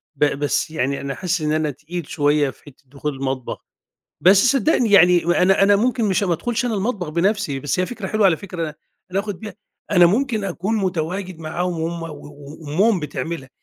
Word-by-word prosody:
ب 145 - +3
بس 145 +1 0
يعني 140 -2 -1
أنا 140 -1 -4
حاسس 180 +1 -2
إن 150 0 0
أنا 155 -1 0
تقيل 155 +4 -7
شوية 145 -1 +1
في - - -14
حتة 145 -1 -17
دخول 140 +2 -4
المطبخ، 130 -2 -4 0.6
بس 190 +3 +6 0.2
صدقني 270 -4 +2
يعني 180 -3 +6
أنا 180 +3 +3
أنا 200 +1 +5
ممكن 235 +2 +1
مش 195 -2 +1
ما 185 -3 +1
ادخلش 235 +9 -1
أنا 240 -2 -1
المطبخ 200 -4 -2
بنفسي، 170 -2 0
بس 145 +6 -1
هي 185 - +1
فكرة 220 -3 -6
حلوة 215 +1 +2
على 170 -4 +3
فكرة 170 -4 -5 0.4
أنا 190 +2 0
آخد 200 -3 -6
بيها، 215 -1 -8 0.4
أنا 180 -3 +6
ممكن 220 +2 0
أكون 195 +4 -2
متواجد 185 -1 -2
معاهم 170 +2 -3
وهُم 165 +1 -3
و - - -4
و 145 -1 -11
وأمهم 180 +7 +1
بتعملها، 145 0 -5
175 Hz, 195 wpm, -21 LUFS, 150-200 Hz, 0.6 s, بس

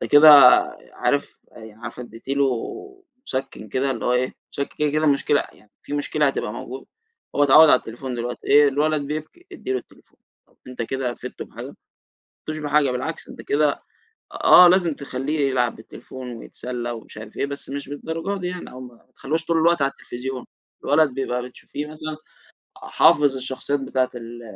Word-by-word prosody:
ده - - -3
كده 145 +2 +8 0.6
عارف - - -1
يعني 110 -1 -12
عارفة 120 +2 -8
اديتِ 115 +1 -13
له 140 0 +2 0.8
مسكّن 130 -5 -5
كده 130 +6 0
اللي - - -4
هو 125 - +2
إيه 125 +1 0 0.2
مسكّن 140 - -4
كده، 150 -1 +1
كده 155 +2 0
المشكلة 145 0 +2
يعني 105 - -23
في - - -10
مشكلة 145 +1 0
هتبقى 135 -5 -2
موجودة، 130 +3 -8 0.5
هو 145 - +3
اتعوّد 150 +3 +8
على 125 - +7
التليفون 125 +3 -7
دلوقتي 120 +1 -5
إيه 145 0 +6
الولد 150 +2 +1
بيبكي 155 - -7
ادّي 330 - -5
له 130 - 0
التليفون، - - -19 0.3
طَب - - -32
أنت 125 -2 -5
كده 125 +1 -3
فِدته - - -8
بحاجة؟ - - -9
ما - - -11 0.7
فِدتوش 155 0 -3
بحاجة 150 -2 +2
بالعكس 130 +6 -4
أنت - - -10
كده 145 0 0 0.4
آه، 180 - +7
لازم 175 -4 +3
تخليه 140 +2 -4
يلعب 125 -3 0
بالتليفون 125 +3 -10
ويتسلّى 120 +1 -6
ومش 115 -2 -10
عارف 110 0 -10
إيه، - - 0
بس 140 0 -7
مش 140 0 -6
للدرجة 165 +7 -4
دي 180 - -2
يعني، 180 0 -6
أو 130 - -10
ما 125 -1 -10
ما - - -28
تخليهوش 160 +4 -3
طول 165 0 +1
الوقت 170 0 +3
على 135 0 +2
التليفزيون، 130 -1 -7 0.4
الولد 155 +1 +3
بيبقى 125 -2 -2
بتشوفيه 145 +3 -7
مثلًا 155 0 -6 0.6
حافظ 145 -2 +3
الشخصيات 130 +2 -2
بتاعة 130 -1 0
ال 120 0 -9
135 Hz, 180 wpm, -22 LUFS, 125-150 Hz, 0.8 s, كده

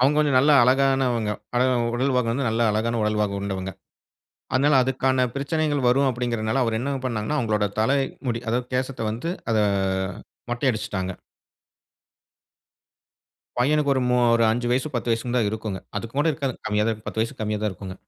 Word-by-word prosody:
அவுங்க 140 +4 +3
கொஞ்சம் 145 -3 +3
நல்லா 145 +4 +5
அழகானவங்க. 130 -4 +2 0.2
அழகா 130 +1 +3 0.2
உடல்வாகு 125 -1 +1
வந்து 130 +2 -1
நல்லா 115 +1 +1
அழகான 115 +2 0
உடல்வாகு 105 -1 0
கொண்டவங்க. 95 -1 -4 0.8
அதனால 140 +3 +4
அதுக்கான 130 0 +1
பிரச்சனைகள் 145 -1 0
வரும் 135 +2 +3
அப்படிங்கிறனால, 120 0 -1
அவரு 115 -1 0
என்னங்க 135 +1 -2
பண்ணாங்கன்னா, 120 +5 -2
அவங்களோட 105 -5 +1
தலை 135 +6 +3 0.3
முடி 115 -1 -1
அதாவது 120 +2 0
கேசத்த 130 +1 -2
வந்து 120 +10 -3 0.2
அத 110 - +2 0.9
மொட்டை 120 +3 -1
அடிச்சிட்டாங்க. 100 -4 -3 2.5
பையனுக்கு 145 +3 +2
ஒரு 130 - +1
மூ 125 - +3 0.2
ஒரு 115 - +3
5 120 +2 -1
வயசு, 130 +4 +1
ஒரு 145 - -18
10 120 0 -2
வயசுனுதான் 115 -1 0
இருக்குங்க. 110 -3 -4 0.2
அதுக்கூட 130 +6 -2
இருக்காதுங்க. 135 -3 -3
கம்மியாதான் 105 +2 +1
இருக்கும், 110 0 -8
10 110 - -2
வயசுக்கு 115 - -6
கம்மியாதான் 105 0 -1
இருக்குங்க. 95 0 -8
120 Hz, 155 wpm, -24 LUFS, 110-135 Hz, 2.5 s, நல்லா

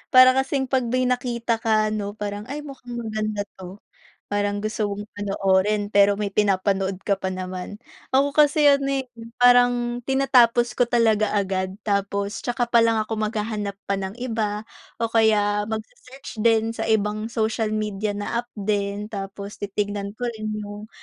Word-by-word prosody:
Para 255 0 +9
kasing 265 +1 +1
pag 260 -3 +1
may 255 +2 +1
nakita 245 -2 0
ka 215 -1 +2
ano, 205 -1 -3
parang, 205 +1 -5
"ay 290 +3 -5
mukhang 265 -4 -9
maganda 215 -2 -2
ito," 190 0 -12 0.4
parang 205 0 -1
gusto 215 -1 -1
mong 205 +1 -5
panoorin 200 0 +1
pero 200 0 +5
may 205 -1 -2
pinapanood 195 -1 +1
ka 200 - +3
pa 190 - -2
naman. 185 +1 -5 0.3
Ako 275 +2 +3
kasi 300 0 +4
ano, 280 -1 +4
eh, 270 -1 -1 0.3
parang 245 -1 +4
tinatapos 245 -2 +3
ko 245 - +2
talaga 220 -3 +3
agad, 190 -1 -1
tapos 200 0 -1
saka 245 0 0
palang 230 -1 +4
ako 220 - -7
maghahanap 210 -2 -2
pa 200 - 0
ng 190 +2 -5
iba, 220 -4 -2 0.3
o 230 - +1
kaya 215 -2 +3
mag 220 0 -2
se-search 255 -3 -11
din 225 0 +3
sa 225 - -4
ibang 215 0 0
social 220 -1 0
media 210 -1 -2
na 235 +3 -1
app 240 - -30
din, 200 0 -1
tapos 200 -1 -7
titignan 205 0 -2
ko 245 - -4
rin 215 -1 -5
yung, 205 +1 -8
215 Hz, 160 wpm, -23 LUFS, 205-240 Hz, 0.4 s, Para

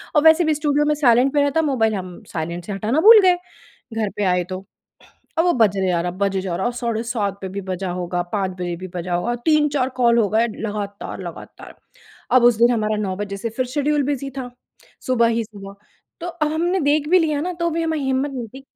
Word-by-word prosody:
और 300 - +4
वैसे 320 +2 +6
भी 310 - +2
स्टूडियो 295 0 +1
में 300 - +2
साइलेंट 260 -1 +3
पे 290 - +3
रहता 285 +3 +2
मोबाइल 240 -8 +1
हम 185 -2 -7
साइलेंट 170 +2 -4
से 205 - -5
हटाना 215 +9 0
भूल 440 +3 +9
गए, 365 -2 +5 0.6
घर 220 -2 -1
पे 210 - 0
आए 180 -1 +2
तो। 185 +1 -6 0.7
अब 330 - +3
वो 350 - +3
बजे 200 -5 +2
जा 175 -2 +1
रहा, 175 +1 -2
बजे 195 +1 -1
जा 185 -2 -3
रहा, 190 +6 0
साढ़े 235 -2 -2
7 210 -5 -2
पे 190 - -4
भी 200 +1 -5
बजा 185 0 -3
होगा, 180 0 -2
5 195 -3 0
बजे 175 -1 -2
भी 185 +2 -7
बजा 175 0 -3
होगा, 235 +8 -1
3-4 295 -4 +2
कॉल 235 -1 +4
हो 215 - +3
गए 225 +3 +2
लगातार-लगातार। 205 -2 -7 0.6
अब 255 -2 +5
उस 240 -2 +6
दिन 235 +2 +5
हमारा 215 -2 0
9 190 -3 -2
बजे 200 -1 -4
से 230 +3 -3
फिर 255 - +1
शेड्यूल 295 0 +1
बिज़ी 275 0 -2
था, 250 -2 -4 0.6
सुबह 240 -2 +3
ही 230 0 0
सुबह। 200 -2 -11 0.5
तो 345 - -4
अ, 340 -3 -2
हमने 345 +5 0
देख 290 +1 +1
भी 365 +2 +6
लिया 305 -3 0
ना, 360 +3 -3
तो 340 0 -1
भी 330 +1 -1
हमारी 320 -2 -1
हिम्मत 265 +2 0
नहीं 245 -3 -5
थी 270 - -9
235 Hz, 225 wpm, -21 LUFS, 195-295 Hz, 0.7 s, भूल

